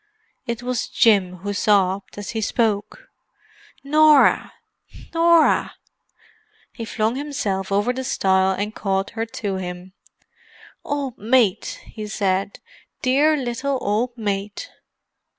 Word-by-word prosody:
It 235 +1 -4
was 250 -1 -2
Jim 195 -5 +3
who 205 - -2
sobbed 200 -1 +1
as 205 -1 -5
he 225 -1 -3
spoke. 220 - -1 0.7
"Norah! 300 0 +5 0.6
Norah!" 335 -1 +3 1.0
He 230 - -6
flung 220 +2 -1
himself 205 -10 -3
over 205 +5 +1
the 260 +1 -4
stile 190 -7 +2
and 205 +3 -3
caught 195 -2 -2
her 225 0 -3
to 205 -3 -4
him. 180 0 -7 0.9
"Old 280 -4 -4
mate!" 225 -3 +1
he 215 -1 -8
said. 195 -1 -1 0.4
"Dear 290 +4 +3
little 260 +1 -2
old 240 +4 -1
mate!" 205 -2 -4
220 Hz, 115 wpm, -22 LUFS, 195-260 Hz, 1.0 s, Norah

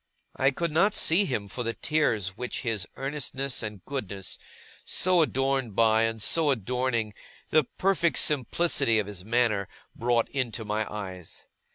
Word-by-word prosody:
I 135 - +3
could 165 +4 -2
not 195 +7 +3
see 180 +6 +4
him 110 - -2
for 125 - -6
the 115 0 -2
tears 115 - +1
which 120 +6 -5
his 110 -6 -1
earnestness 135 -1 -2
and 105 -4 -6
goodness, 100 -9 -4 0.4
so 180 -1 +3
adorned 135 -6 0
by, 110 0 +4
and 115 0 -2
so 155 +8 +2
adorning, 125 -2 0 0.4
the 155 -2 +4
perfect 185 -3 +2
simplicity 140 -3 +2
of 105 - +1
his 100 -3 -7
manner, 110 -3 +1 0.3
brought 120 -1 +1
into 120 -4 -3
my 105 +1 -2
eyes. 95 -5 -7
120 Hz, 150 wpm, -27 LUFS, 105-140 Hz, 0.4 s, see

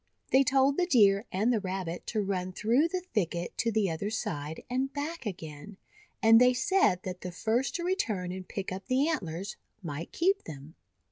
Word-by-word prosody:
They 265 - +6
told 275 0 +3
the 355 - +2
Deer 205 - +5
and 215 +6 +2
the 225 - +2
Rabbit 185 -3 -4
to 215 -3 0
run 185 -2 -2
through 240 - +2
the 365 +2 -3
thicket 175 -4 -1
to 230 - +1
the 210 -4 +1
other 180 +6 -3
side, 150 -8 -4
and 260 +2 -1
back 290 -1 -4
again; 170 +1 -8 0.5
and 225 +1 +7
they 250 0 +5
said 260 - +2
that 180 -1 -6
the 180 - -5
first 225 +8 0
to 345 - -2
re 365 +2 +1
turn 195 - -2
and 185 0 -7
pick 195 -2 -4
up 190 +1 -6
the 265 +3 +2
antlers, 195 - -3 0.3
might 160 0 -5
keep 385 +4 +1
them. 150 0 -9
210 Hz, 195 wpm, -29 LUFS, 180-265 Hz, 0.5 s, and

